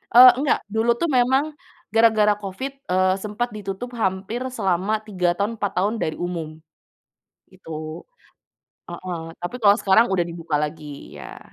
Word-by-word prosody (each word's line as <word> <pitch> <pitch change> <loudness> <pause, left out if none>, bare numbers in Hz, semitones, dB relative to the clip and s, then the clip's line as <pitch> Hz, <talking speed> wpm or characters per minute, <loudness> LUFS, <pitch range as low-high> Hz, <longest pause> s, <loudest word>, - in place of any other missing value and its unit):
Eee 250 +1 +11
nggak, 290 - +2
dulu 225 +2 +1
tuh 335 - 0
memang 260 +3 +3 0.5
gara-gara 220 -2 +5
covid, 200 +8 -5 0.2
eee, 185 0 +3
sempat 215 +3 -2
ditutup 200 +3 -5
hampir 190 +5 -1
selama 195 -4 0
3 180 -4 0
tahun, 205 +3 -1
4 205 -2 -1
tahun 205 +5 +1
dari 155 - -2
umum, 175 -3 -4 1.0
itu. - - -16 1.2
Heeh, 180 -2 -6 0.2
tapi 175 - -4
kalo 200 -1 +7
sekarang 215 +3 +4
udah 190 -2 +2
dibuka 165 -2 -5
lagi, 150 +1 -4 0.3
iya. - - -9
200 Hz, 140 wpm, -23 LUFS, 180-225 Hz, 1.2 s, Eee